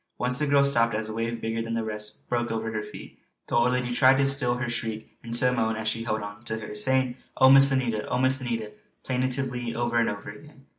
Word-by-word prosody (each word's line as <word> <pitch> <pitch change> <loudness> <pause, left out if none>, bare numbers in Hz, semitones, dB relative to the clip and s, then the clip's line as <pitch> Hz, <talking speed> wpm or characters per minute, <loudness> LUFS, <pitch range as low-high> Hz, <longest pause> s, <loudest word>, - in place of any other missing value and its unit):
Once 125 +1 0
the 150 - +1
girl 140 0 +4
stopped 115 -5 +3
as 110 0 -2
a - - -5
wave 115 +1 -3
bigger 115 0 -3
than 115 0 -4
the 115 -1 -1
rest 105 -1 -4
broke 120 -1 -1
over 110 0 -3
her 105 - -2
feet. - - -11 0.3
The - - -3
old 120 +1 +3
lady 125 -1 -1
tried 130 +2 +5
to 140 - +3
still 135 -3 0
her 125 0 -3
shriek 115 -2 -5
into 120 +2 0
a 125 - +2
moan 110 -2 0
as 110 0 -4
she 115 +1 -2
held 110 -2 -2
on 105 +2 -9
to 110 0 -3
her, 105 -1 -7
saying 130 +4 +1 0.2
"Oh 130 0 +7
Miss 135 0 +8
Anita! 120 -5 -1
Oh 125 - -1
Miss 130 +2 +3
Anita!" 115 -4 -3 0.3
plaintively 125 -2 -2
over 120 0 -1
and 115 - +2
over 105 0 -6
again. 140 +5 -16
120 Hz, 245 wpm, -26 LUFS, 110-130 Hz, 0.3 s, Miss